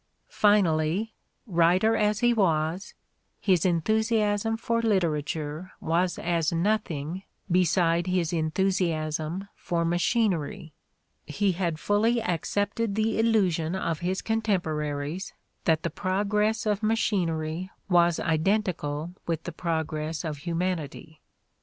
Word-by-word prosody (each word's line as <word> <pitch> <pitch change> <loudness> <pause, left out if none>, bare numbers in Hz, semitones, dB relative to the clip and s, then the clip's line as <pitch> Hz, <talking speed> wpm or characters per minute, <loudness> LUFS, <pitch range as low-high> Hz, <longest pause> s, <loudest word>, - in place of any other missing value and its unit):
Finally, 195 0 +2 0.3
writer 185 +3 +3
as 210 0 +1
he 240 0 +4
was, 170 -3 0 0.4
his 185 -3 +2
enthusiasm 215 +4 +1
for 230 0 0
literature 160 -5 -1
was 175 +2 0
as 170 0 0
nothing 170 -3 -1 0.3
beside 170 -1 +2
his 180 -2 0
enthusiasm 165 0 -1
for 170 -1 -2
machinery: 175 - 0 0.5
he 195 +7 +1
had 170 -3 -1
fully 220 +6 +2
accepted 205 +2 -1
the 220 0 0
illusion 190 -7 +2
of 165 -4 -2
his 185 +2 -2
contemporaries 165 -7 -2 0.3
that 160 -2 +2
the - - -2
progress 210 +5 0
of 210 -1 0
machinery 180 -6 0 0.2
was 175 -3 +3
identical 165 -2 0
with 165 -2 -2
the 175 - -5
progress 160 -1 -3
of 155 -2 -3
humanity. 165 -2 -3
175 Hz, 105 wpm, -27 LUFS, 160-205 Hz, 0.5 s, he